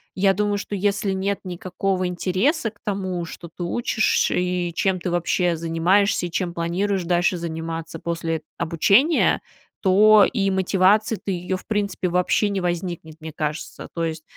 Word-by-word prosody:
я 195 0 +3
думаю, 205 +1 0
что 205 - -5
если 200 0 0
нет 195 +1 -1
никакого 185 +1 -2
интереса 195 - 0
к 205 - -24
тому, 185 -4 -2
что 170 +1 -9
ты 175 - -5
учишь 220 +4 +1
и 180 -1 -1
чем 190 0 +1
ты 175 - -3
вообще 175 0 +1
занимаешься 175 +4 +2
и - - -11
чем 175 -1 -2
планируешь 180 +3 -1
дальше 175 +1 +2
заниматься 165 -1 -5
после 165 -1 -3 0.2
обучения, 200 - +3 0.4
то 210 +2 +6
и 195 -3 +1
мотивации-то, 195 +3 +2
ее, 185 0 -2
в - - -15
принципе, 200 -4 -1
вообще 180 +4 +2
не 200 -1 -2
возникнет, 175 -2 -4
мне 160 -1 -8
кажется. 150 +1 -5
То 165 -1 -1
есть, 160 -1 -4
180 Hz, 155 wpm, -23 LUFS, 170-200 Hz, 0.4 s, то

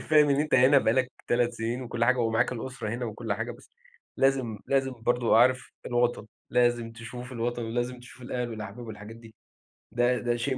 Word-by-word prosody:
فاهم 150 -1 +6
إن 140 +1 +3
أنت 150 - 0
هنا 130 +2 +7
بقى 110 - +2
لَك 130 0 +1 0.2
3 120 0 +2
سنين 115 +2 -3
وكلّ 120 -1 -1
حاجة 125 +1 +3
ومعاك 115 +1 +1
الأسرة 125 -1 -5
هنا 120 +3 -3
وكلّ 110 -1 -4
حاجة، 115 +4 -3
بس 120 - -17 0.5
لازم 130 -5 +1
لازم 135 -1 +1
برضه 120 -1 +3
عارف 130 +2 +3
الوطن، 120 -3 0 0.2
لازم 120 -2 +2
تشوف 120 +2 -8
الوطن 120 0 -2
ولازم 120 +2 -3
تشوف 125 +1 -14
الأهل 125 0 -3
والأحباب 110 +2 -7
والحاجات 105 +1 -9
دي، 115 -1 -15 0.6
ده 120 +1 +2
ده 120 -1 0
شيء 130 +2 -1
120 Hz, 185 wpm, -28 LUFS, 115-125 Hz, 0.6 s, هنا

